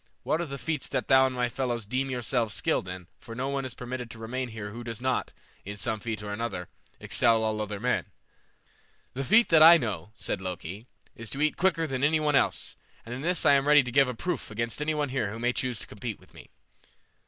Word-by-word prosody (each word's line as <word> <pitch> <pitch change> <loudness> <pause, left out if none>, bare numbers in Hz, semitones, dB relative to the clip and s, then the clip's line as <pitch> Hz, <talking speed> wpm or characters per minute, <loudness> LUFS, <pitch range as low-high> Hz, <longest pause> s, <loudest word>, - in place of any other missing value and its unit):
What 160 - 0
are 170 - -3
the 140 0 -5
feats 150 +3 -3
that - - -2
thou 130 -1 +6
and 130 -1 -5
thy 125 0 +2
fellows 120 -3 -2
deem 130 +5 -1
yourselves 120 -4 0
skilled 95 - 0
in, 90 0 -7
for 115 - -10
no 130 +3 -2
one 140 -1 -2
is 130 - -6
permitted 125 -1 -5
to 115 - -10
remain 125 +3 -4
here 110 -2 -6
who 120 +3 -7
does 115 -2 -5
not, 130 0 -1 0.3
in 100 +1 -7
some 110 -1 -1
feat 110 -1 -4
or 105 - -5
other, 100 -7 -4 0.3
excel 115 -2 +3
all 110 -1 0
other 105 -1 -4
men?" 125 +3 0 1.1
"The 135 +2 -3
feat 220 - +5
that 160 -2 +6
I 165 +2 +10
know," 110 -6 -4
said - - -3
Loki, 95 +4 -6 0.3
"is 115 -1 -7
to 140 - -3
eat 155 - +2
quicker 170 -3 +2
than 135 -3 -3
any 155 +2 +4
one 150 -1 +1
else, - - +1 0.3
and 115 - -6
in 125 - -5
this 175 +2 +1
I - - +7
am 140 0 +3
ready 150 -1 +7
to 125 - -5
give 135 0 +4
a 125 - -4
proof 175 +3 -3
against 115 +5 -3
any 155 +1 0
one 145 -2 -1
here 130 -6 -1
who 110 - -6
may 120 +1 0
choose 125 -2 -1
to - - -8
compete 105 +1 -6
with - - -21
me." - - -14
125 Hz, 240 wpm, -28 LUFS, 110-140 Hz, 1.1 s, I